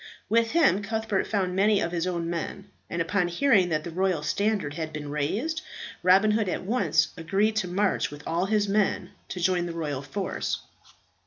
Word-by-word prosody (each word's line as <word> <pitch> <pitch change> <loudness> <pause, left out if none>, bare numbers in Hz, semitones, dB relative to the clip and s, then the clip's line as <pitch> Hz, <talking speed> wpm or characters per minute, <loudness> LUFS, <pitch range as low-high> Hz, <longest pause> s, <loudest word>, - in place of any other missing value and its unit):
With 230 +2 +2
him 320 - +4
Cuthbert 220 -2 -1
found 185 -4 -1
many 205 +1 +4
of 170 - -1
his 175 0 -1
own 170 -2 -2
men; 175 +4 -5 0.2
and 170 0 -1
upon 180 +1 +1
hearing 190 -1 +3
that 155 -2 0
the 170 - -6
royal 180 -3 0
standard 195 0 0
had 155 0 -4
been 150 -1 -6
raised, 225 - -1 0.4
Robin 190 +4 +5
Hood 210 -2 +1
at - - -2
once 170 -8 +2
agreed 195 +6 +1
to 200 -4 0
march 195 +3 +1
with 145 0 -10
all 175 +3 0
his 210 0 +2
men 205 0 0 0.2
to 185 - -5
join 175 0 +1
the 170 - -5
royal 150 -5 -3
force. 190 +8 -3
185 Hz, 185 wpm, -26 LUFS, 165-210 Hz, 0.4 s, Robin